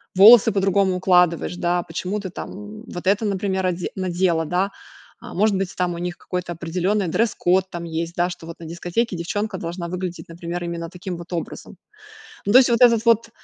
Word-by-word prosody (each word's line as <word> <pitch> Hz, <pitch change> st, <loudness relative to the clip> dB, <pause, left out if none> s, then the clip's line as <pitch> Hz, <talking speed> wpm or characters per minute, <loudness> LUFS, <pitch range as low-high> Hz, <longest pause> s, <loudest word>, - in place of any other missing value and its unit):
волосы 210 Hz, +4 st, +8 dB
по-другому 195 Hz, -1 st, +2 dB
укладываешь, 180 Hz, -2 st, +2 dB
да, 175 Hz, 0 st, 0 dB
почему 180 Hz, +5 st, -4 dB
ты 190 Hz, -3 st, -6 dB
там, -, -, -7 dB, 0.3 s
м, -, -, -12 dB
вот 175 Hz, +1 st, -7 dB
это, 200 Hz, +3 st, +2 dB
например, 190 Hz, -2 st, -1 dB
оде 175 Hz, 0 st, -2 dB
надела", 180 Hz, -3 st, 0 dB
да. 180 Hz, +5 st, 0 dB, 0.5 s
А -, -, -10 dB
может 205 Hz, +1 st, +3 dB
быть, 190 Hz, -1 st, -2 dB
там 180 Hz, -1 st, 0 dB
у 170 Hz, -, -6 dB
них 175 Hz, 0 st, -4 dB
какой-то 180 Hz, -1 st, -4 dB
определенный 180 Hz, +4 st, -1 dB
дресс-код 190 Hz, -2 st, +1 dB
там 175 Hz, -1 st, -6 dB
есть 165 Hz, +1 st, -4 dB
да, 175 Hz, +1 st, +1 dB
что 165 Hz, -, -10 dB
вот 165 Hz, -, -8 dB
на 170 Hz, -, -9 dB
дискотеке 175 Hz, +6 st, -2 dB
девчонка 195 Hz, +4 st, -3 dB
должна 170 Hz, +1 st, -5 dB
выглядеть, 180 Hz, 0 st, -5 dB
например, 170 Hz, +1 st, -5 dB
именно 170 Hz, -1 st, -4 dB
таким 180 Hz, 0 st, -6 dB
вот 175 Hz, +1 st, -10 dB
образом. 170 Hz, -2 st, -6 dB, 0.7 s
Ну, 205 Hz, -, +2 dB
то 250 Hz, -, +9 dB
есть 250 Hz, -, +3 dB
вот 235 Hz, 0 st, +2 dB
этот 230 Hz, -2 st, +5 dB
вот 230 Hz, -1 st, +3 dB
180 Hz, 195 wpm, -22 LUFS, 170-195 Hz, 0.7 s, то